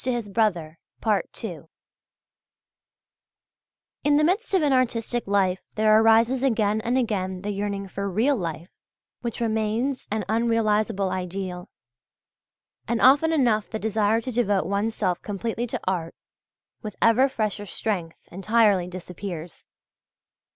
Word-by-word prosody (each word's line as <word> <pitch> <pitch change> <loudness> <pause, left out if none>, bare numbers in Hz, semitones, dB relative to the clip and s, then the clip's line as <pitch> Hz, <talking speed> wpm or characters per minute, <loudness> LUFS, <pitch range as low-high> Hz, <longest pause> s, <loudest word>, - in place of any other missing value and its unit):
In 255 -1 0
the 205 -2 -2 2.4
midst 305 +10 +2
of 375 - +3
an 285 -2 +3
artistic 240 -2 0
life 190 -2 0
there 215 0 +5
arises 225 +3 +4
again 220 -5 +1
and 240 +3 0
again 190 -6 -1
the 205 - -2
yearning 200 0 -3
for 200 +1 -4
real 230 +10 +2
life, 170 - -5 0.5
which 235 -2 -4
remains 225 +4 -1
an 215 +1 -2
unrealizable 215 -4 +1
ideal. 180 -1 -5 1.2
And 235 0 0
often 285 +5 +5
enough 235 -9 +2
the 220 - -3
desire 220 +1 +1
to 255 - -5
devote 205 -5 +1
one's 205 +3 -1
self 180 -1 -1
completely 225 +4 -3
to - - -4
art, 175 -3 -2 0.7
with 210 -2 -7
ever 245 +4 +4
fresher 215 -4 -3
strength, 180 -5 -3
entirely 200 -1 +2
disappears. 180 -1 -8
215 Hz, 115 wpm, -25 LUFS, 195-235 Hz, 2.4 s, there